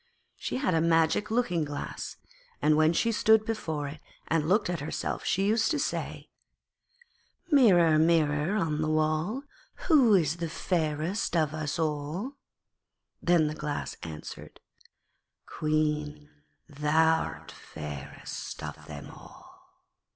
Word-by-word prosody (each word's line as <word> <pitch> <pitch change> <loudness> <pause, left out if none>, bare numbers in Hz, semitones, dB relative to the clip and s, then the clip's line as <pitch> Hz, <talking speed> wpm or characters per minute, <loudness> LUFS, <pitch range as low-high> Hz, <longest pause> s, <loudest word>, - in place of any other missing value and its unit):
She - - -4
had 260 -8 0
a 160 - +3
magic 165 +4 +2
looking 215 -8 +1
glass, 145 -1 -6 0.4
and 155 0 +3
when 155 +1 +4
she 230 +7 +1
stood 220 0 +4
before 160 -10 -3
it 150 +2 -8 0.3
and 160 0 +1
looked 205 +4 +3
at 175 -2 -2
herself 145 +3 -3
she 195 - +1
used 215 +1 +2
to 310 - +1
say: 285 - -3 1.2
'Mirror, 175 - +6
Mirror 160 +2 +2
on 155 -7 0
the 155 - 0
wall, 155 - 0 0.5
Who 260 - +6
is 160 -5 +2
fairest 170 +1 -1
of 155 -2 +1
us 155 0 -3
all?' 160 - -2 0.9
then 175 -2 +4
the 150 - -1
Glass 150 -1 -4
answered, 80 -2 -9 0.9
'Queen, 150 -1 -1 0.4
thou'rt 160 +2 +1
fairest 75 -2 -8
of - - -8
them 75 -1 -8
all.' - - -15
160 Hz, 120 wpm, -28 LUFS, 150-185 Hz, 1.2 s, Mirror